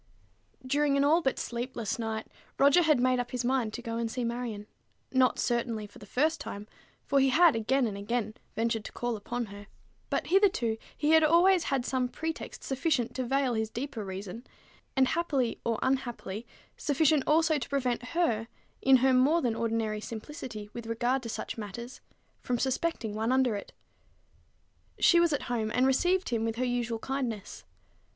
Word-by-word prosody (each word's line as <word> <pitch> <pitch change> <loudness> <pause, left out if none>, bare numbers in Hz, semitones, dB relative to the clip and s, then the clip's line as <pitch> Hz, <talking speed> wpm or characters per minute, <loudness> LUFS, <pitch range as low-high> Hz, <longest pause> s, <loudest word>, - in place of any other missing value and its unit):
During 285 +1 +2
an 280 - +3
all 315 +4 +4
but 265 -4 0
sleepless 235 -3 -3
night, 220 -1 -3 0.3
Roger 280 +5 +6
had 310 -5 +4
made 255 0 +3
up 245 0 -2
his 250 -1 -3
mind 250 -3 +1
to 240 - -6
go 230 -1 -3
and 230 -1 -1
see 250 +2 -3
Marion: 235 -3 -3 0.5
not, 260 -1 +3
certainly, 235 -3 -1
for 205 - -14
the 205 - -12
first 310 +7 +1
time, 205 -6 -7 0.4
for 280 - +3
he 270 0 +4
had 325 +1 +5
again 250 +4 +1
and 210 -3 -3
again 215 +2 -2 0.2
ventured 225 -1 0
to - - -6
call 240 -1 -2
upon 240 +3 -4
her; 205 0 -11 0.4
but - - -1
hitherto 365 - +3 0.2
he 300 +1 +2
had 320 0 +6
always 345 +3 +5
had 270 -3 0
some 255 -1 0
pretext 320 +4 -5
sufficient 270 -3 0
to 260 - -2
veil 265 0 +1
his 220 -1 -1
deeper 240 -2 -5
reason, 195 +4 -6 0.5
and, 260 -1 +4
happily 295 -8 0
or 230 -1 0
unhappily, 240 -5 -2 0.3
sufficient 295 0 +3
also 315 0 +3
to 240 - -6
prevent 255 -4 0
her, 250 -5 0 0.3
in 265 0 +6
her 265 - +5
more 275 +7 +4
than 240 -3 +1
ordinary 225 -2 -1
simplicity 225 -2 -7
with 235 -1 -7
regard 240 +3 0
to 235 - -6
such 225 - -5
matters, 235 +4 -7 0.4
from 245 - -1
suspecting 260 -3 -1
one 220 +3 -1
under 260 -4 +3
it. 200 - -7 1.3
She 345 - +5
was 340 -1 +4
at 290 - -1
home, 230 -3 -1
and 250 +4 +2
received 360 +8 +2
him 230 -2 0
with 225 0 -1
her 255 +2 -1
usual 240 -2 -1
kindness. 235 -5 -4
245 Hz, 180 wpm, -29 LUFS, 225-280 Hz, 1.3 s, Roger